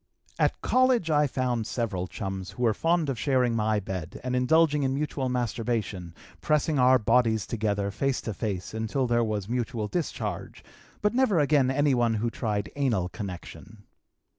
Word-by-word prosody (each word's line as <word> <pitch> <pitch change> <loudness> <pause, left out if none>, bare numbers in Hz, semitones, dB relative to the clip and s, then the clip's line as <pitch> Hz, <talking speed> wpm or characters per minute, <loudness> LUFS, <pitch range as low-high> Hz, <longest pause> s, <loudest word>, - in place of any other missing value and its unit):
"At - - +1
college 255 -9 +3
I 150 -1 +4
found 125 -4 -1
several 105 -8 -2
chums 95 0 -5
who 125 - -5
were 115 -2 +4
fond 165 +4 +1
of 130 -4 -2
sharing 125 -3 +2
my 110 -1 +1
bed 95 -4 -6
and 125 0 -1
indulging 150 +3 +3
in 135 -1 0
mutual 140 -2 -2
masturbation, 115 -7 -2 0.3
pressing 150 - +1
our 130 +1 +6
bodies 110 -2 +2
together 105 -3 -1
face 130 +6 -1
to 110 - -4
face 95 -2 -4
until 110 +4 -1
there 120 -1 +2
was 105 -3 -2
mutual 120 -2 -2
discharge, 165 +8 -4 0.4
but 210 - +2
never 245 -7 +3
again 145 -3 +3
anyone 130 -5 +2
who 115 +2 -1
tried 105 -4 -2
anal 115 -11 0
connection. 100 +2 -8
120 Hz, 160 wpm, -27 LUFS, 105-140 Hz, 0.4 s, our